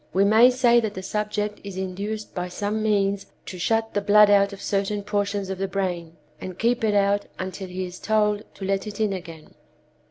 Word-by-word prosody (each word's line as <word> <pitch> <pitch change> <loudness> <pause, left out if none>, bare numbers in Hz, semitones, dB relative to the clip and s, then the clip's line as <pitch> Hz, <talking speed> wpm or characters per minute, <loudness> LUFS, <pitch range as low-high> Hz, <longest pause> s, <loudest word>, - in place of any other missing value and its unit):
We 195 - +3
may 220 +4 +7
say 245 -2 +4
that 220 -3 -3
the 190 - -6
subject 210 +1 -3
is 200 -2 -7
induced 200 +3 -4
by 180 -1 -3
some 205 +4 -3
means 200 -2 +1 0.2
to 185 - -8
shut 225 +4 0
the 205 - 0
blood 205 +1 +6
out 200 0 +4
of 200 - -9
certain 200 +1 -1
portions 205 -1 -2
of 190 - -5
the 195 - -1
brain, 175 -4 -3 0.2
and 185 -1 -7
keep 235 +1 +1
it 210 -2 +2
out 200 0 +2
until 185 +1 -5
he 185 +1 -4
is 180 0 -9
told 210 -1 +1
to 195 - -6
let 195 +1 -1
it 210 0 -7
in 215 -2 +1
again. 165 -4 -9
200 Hz, 210 wpm, -24 LUFS, 190-210 Hz, 0.2 s, may